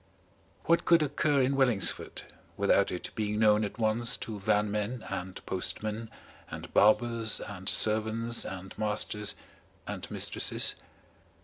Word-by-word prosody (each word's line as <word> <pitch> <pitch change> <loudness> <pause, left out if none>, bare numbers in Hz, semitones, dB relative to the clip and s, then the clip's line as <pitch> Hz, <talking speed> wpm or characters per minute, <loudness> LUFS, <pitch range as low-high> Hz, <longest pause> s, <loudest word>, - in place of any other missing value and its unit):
What 170 0 +2
could 165 -2 +4
occur 145 -1 +1
in 135 +2 +1
Wellingsford 125 -8 0 0.3
without 100 0 +2
it 90 - -5
being 105 -1 -2
known 105 0 +4
at 105 - -5
once 115 +2 +1
to 110 -2 -6
vanmen 105 +4 -1
and 95 -1 -6
postmen 110 +4 -3 0.4
and - - -9
barbers 115 +1 +3
and 95 -2 -5
servants 110 +2 +2
and 95 0 -8
masters 105 -1 0 0.5
and - - -6
mistresses? - - +2
110 Hz, 120 wpm, -29 LUFS, 105-115 Hz, 0.5 s, could